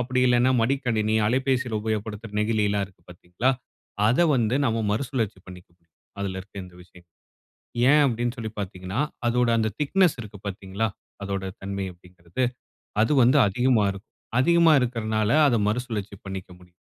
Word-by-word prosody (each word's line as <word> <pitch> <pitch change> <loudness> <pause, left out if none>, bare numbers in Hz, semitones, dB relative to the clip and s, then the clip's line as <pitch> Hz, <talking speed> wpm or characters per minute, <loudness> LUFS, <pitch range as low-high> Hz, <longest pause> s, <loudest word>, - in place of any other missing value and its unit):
அப்படி 125 +1 0
இல்லன்னா 125 +1 +4
மடிக்கணினி, 115 -4 +1
அலைபேசில 125 -2 0
உபயோகப்படுத்துற 110 0 -4
நெகிழி 105 -1 +1
எல்லாம் 100 -1 0
இருக்கு 95 -3 -24
பாத்தீங்களா, 90 +8 -1 0.6
அத 150 +9 +4
வந்து 120 -1 +1
நம்ம 115 0 0
மறுசுழற்சி 115 -4 -2
பண்ணிக்க 90 -1 -12
முடியும். 85 -2 -42 0.3
அதில 95 -1 -3
இருக்க 100 +1 -15
இந்த 90 -1 -15
விஷயங்கள. 90 -1 -20 0.8
ஏன் 150 +1 +6
அப்டின்னு 120 0 -1
சொல்லி 110 -2 -5
பாத்தீங்கன்னா, 95 +3 -4 0.3
அதோட 120 0 +2
அந்த 110 -1 +1
திக்னெஸ் 175 +1 +2
இருக்கு, 105 -2 -10
பாத்தீங்களா? 100 +3 -3 0.4
அதோட 100 -1 -3 0.2
தன்மை 100 0 -3
அப்டிங்கிறது, 90 +4 -6 0.6
அது 115 +7 +3
வந்து 130 +5 +5
அதிகமா 120 +1 +2
இருக்கும். 95 0 -11 0.3
அதிகமா 170 +3 +5
இருக்கறதனால 110 -3 0 0.2
அத 120 - +2
மறுசுழற்சி 110 -4 -3
பண்ணிக்க 95 -1 -6
முடியும். 90 -1 -21
110 Hz, 145 wpm, -25 LUFS, 95-125 Hz, 0.8 s, ஏன்